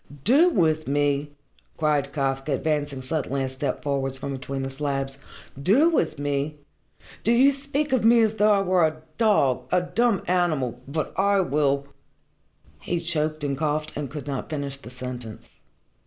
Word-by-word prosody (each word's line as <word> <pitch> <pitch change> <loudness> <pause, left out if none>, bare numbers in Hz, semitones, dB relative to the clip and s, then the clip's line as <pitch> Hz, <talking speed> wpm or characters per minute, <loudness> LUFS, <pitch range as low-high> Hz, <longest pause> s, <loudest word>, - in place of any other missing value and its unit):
"Do 290 - +5
with 155 - +1
me?" 145 +1 +1 0.5
cried 150 -3 +1
Kafka, 135 0 -1
advancing 145 -2 -1
suddenly 140 -1 -1
a 130 - -2
step 130 0 -3
forwards 135 -2 -1
from 135 +1 -5
between 135 +1 -4
the 135 - -4
slabs. 135 -1 -3 0.4
"Do 260 - +4
with 160 - 0
me? 145 +1 -2 0.7
Do 230 - +2
you 260 +4 +6
speak 280 +1 -1
of 255 - +2
me 230 +1 +6
as 220 -1 +2
though 210 0 +4
I 200 -1 +4
were 185 -2 +3
a 155 0 0 0.2
dog 140 - +2
a 180 - +3
dumb 230 +1 +1
animal 155 -9 0
but 155 +2 -3
I 200 0 +3
will 140 -4 +1 0.5
" 75 0 -34
He 175 - -2
choked 155 -2 -1
and 140 -1 -1
coughed, 150 +1 -2
and 145 -2 -4
could 145 0 -7
not 140 -3 -4
finish 140 -3 -3
the 140 - -12
sentence. 125 -3 -8
150 Hz, 170 wpm, -25 LUFS, 135-180 Hz, 0.7 s, you